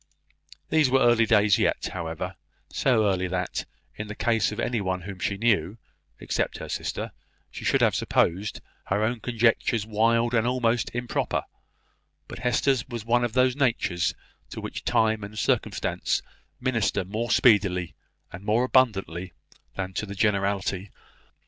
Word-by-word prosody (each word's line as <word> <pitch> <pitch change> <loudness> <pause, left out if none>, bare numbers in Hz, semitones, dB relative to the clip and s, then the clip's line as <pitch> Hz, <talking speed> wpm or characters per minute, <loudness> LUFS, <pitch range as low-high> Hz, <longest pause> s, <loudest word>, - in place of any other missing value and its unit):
These 155 -4 +4
were 135 - +4
early 120 -3 +4
days 105 -2 +4
yet, - - 0
however; 80 -3 -4 0.4
so 115 -5 +2
early 95 -1 +1
that, 90 0 -3 0.3
in 105 - -6
the 105 - -6
case 115 -3 +1
of 105 - -6
any 120 -2 0
one 95 -1 -2
whom 95 +1 -8
she 100 +1 -1
knew, 105 -3 +1 0.4
except - - -2
her - - -7
sister, - - -3 0.4
she - - -8
should - - +2
have - - +4
supposed 95 +5 0 0.2
her 105 +3 0
own 120 +2 0
conjectures 115 -1 +1
wild 115 +2 +2
and 115 0 +2
almost 120 -2 +1
improper; 120 0 -1 0.8
but - - -8
Hester's 125 0 +1
was 115 -3 -5
one 120 +1 +2
of 120 -2 -1
those 125 0 +3
natures 115 -10 0 0.3
to - - -7
which - - -6
time 110 -1 +2
and 105 +1 -8
circumstance - - 0 0.4
minister 120 -7 0
more 110 +5 -3
speedily 95 -7 +3 0.4
and 90 +3 -8
more 110 +4 +2
abundantly 95 -9 +1 0.4
than 95 -1 -4
to 105 - -3
the 100 - -7
generality. 100 -2 0
110 Hz, 150 wpm, -26 LUFS, 95-120 Hz, 0.8 s, These